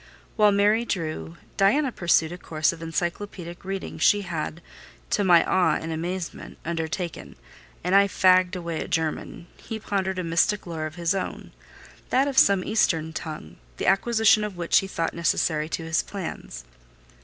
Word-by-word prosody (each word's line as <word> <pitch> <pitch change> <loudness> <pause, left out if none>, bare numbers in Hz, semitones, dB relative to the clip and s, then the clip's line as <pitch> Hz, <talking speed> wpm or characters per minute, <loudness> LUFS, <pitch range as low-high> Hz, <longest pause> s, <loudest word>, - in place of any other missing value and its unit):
While 210 -1 +5
Mary 205 +3 +3
drew, 155 - -4 0.2
Diana 250 +8 +3
pursued 170 -5 +2
a 175 - -6
course 155 -1 0
of 165 - -11
encyclopædic 175 +2 -4
reading 195 0 -5
she 205 - +4
had 170 -2 -5 0.5
(to 205 - +2
my 175 -3 +6
awe 185 -1 +2
and 160 - -4
amazement) 170 +2 -5
undertaken, 170 +1 -4 0.5
and 180 +2 0
I 200 0 +6
fagged 185 -1 +4
away 170 -3 -4
at - - -6
German, 160 +1 -2
he 225 - -6
pondered 190 -3 -2
a 185 - -2
mystic 170 +5 +1
lore 160 -3 -4
of 155 - -11
his 170 0 0
own: 195 - -5 0.6
that 265 +2 +3
of 275 -2 +3
some 200 -2 +4
Eastern 165 -7 +1
tongue, 155 - -7 0.2
the - - -3
acquisition 220 +2 +4
of 205 -4 -5
which 170 -1 +3
he 195 - -5
thought 165 -3 -2
necessary 155 -2 0
to 165 - -3
his 160 0 +1
plans. 180 - -7
175 Hz, 165 wpm, -25 LUFS, 165-200 Hz, 0.6 s, my